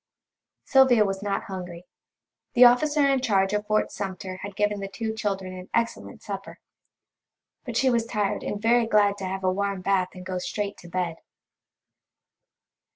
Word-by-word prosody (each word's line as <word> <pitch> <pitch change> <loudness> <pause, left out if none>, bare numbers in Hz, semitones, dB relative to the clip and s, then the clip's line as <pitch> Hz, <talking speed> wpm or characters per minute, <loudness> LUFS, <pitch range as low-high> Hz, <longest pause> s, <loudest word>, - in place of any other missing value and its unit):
Sylvia 260 -5 +5
was 195 -1 -3
not 200 -1 -2
hungry. 180 -2 -7 0.7
The 245 +1 +9
officer 290 +4 +4
in 270 -2 +2
charge 195 -4 +2
of 210 0 -1
Fort 215 0 +1
Sumter 190 -2 -5
had 200 +1 -8
given 210 0 0
the 195 - -4
two 220 +3 -4
children 195 -4 -3
an 185 0 -10
excellent 230 0 -2
supper. - - -7 1.1
But 240 -3 -3
she 260 +1 +3
was 230 -1 +1
tired 210 -3 -1
and 205 - -4
very 230 +1 +3
glad 205 -2 +3
to 190 - -4
have 190 +1 -4
a 185 0 +2
warm 200 -1 -2
bath 185 -1 +1
and 185 0 -10
go 185 -1 -3
straight 205 +2 -3
to 175 - -13
bed. 175 -2 -2
200 Hz, 165 wpm, -25 LUFS, 190-230 Hz, 1.1 s, The